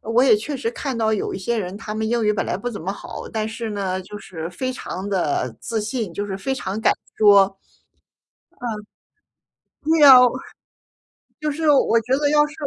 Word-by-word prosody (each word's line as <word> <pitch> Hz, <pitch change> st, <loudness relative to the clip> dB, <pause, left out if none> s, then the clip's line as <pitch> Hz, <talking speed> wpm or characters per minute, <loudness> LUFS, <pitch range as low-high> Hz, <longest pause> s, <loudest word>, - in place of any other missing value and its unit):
我 225 Hz, +3 st, +2 dB
也 255 Hz, -5 st, +6 dB
确 275 Hz, +7 st, -4 dB
实 230 Hz, -3 st, -2 dB
看 265 Hz, 0 st, -4 dB
到 220 Hz, -1 st, +1 dB
有 210 Hz, -, -2 dB
一 -, -, -4 dB
些 225 Hz, +4 st, -1 dB
人， 185 Hz, 0 st, -4 dB
他 215 Hz, -1 st, -7 dB
们 220 Hz, 0 st, -2 dB
英 235 Hz, -1 st, 0 dB
语 210 Hz, -, +3 dB
本 205 Hz, -, -2 dB
来 -, -, -1 dB
不 245 Hz, +5 st, -4 dB
怎 205 Hz, -, -7 dB
么 190 Hz, +4 st, -3 dB
好， -, -, -8 dB
但 220 Hz, -1 st, -2 dB
是 225 Hz, -1 st, -5 dB
呢， 190 Hz, -2 st, -2 dB
就 205 Hz, +3 st, -10 dB
是 165 Hz, -4 st, -7 dB
非 255 Hz, +9 st, -4 dB
常 200 Hz, -5 st, -6 dB
的 150 Hz, -, -1 dB
自 225 Hz, -2 st, -2 dB
信， 215 Hz, -5 st, -4 dB
就 205 Hz, -, -2 dB
是 195 Hz, -1 st, -5 dB
非 265 Hz, +7 st, -2 dB
常 205 Hz, -3 st, -4 dB
敢 -, -, +4 dB, 0.2 s
说。 200 Hz, -2 st, +6 dB
嗯。 -, -, -51 dB, 2.3 s
对 320 Hz, -2 st, +5 dB
啊， 265 Hz, -2 st, +11 dB, 1.2 s
就 305 Hz, -, -1 dB
是 305 Hz, +1 st, +1 dB
我 245 Hz, -5 st, +4 dB
觉 250 Hz, +4 st, -3 dB
得 290 Hz, -1 st, +1 dB
要 295 Hz, 0 st, +4 dB
是 295 Hz, -, -12 dB
220 Hz, 220 characters per minute, -22 LUFS, 200-255 Hz, 2.3 s, 啊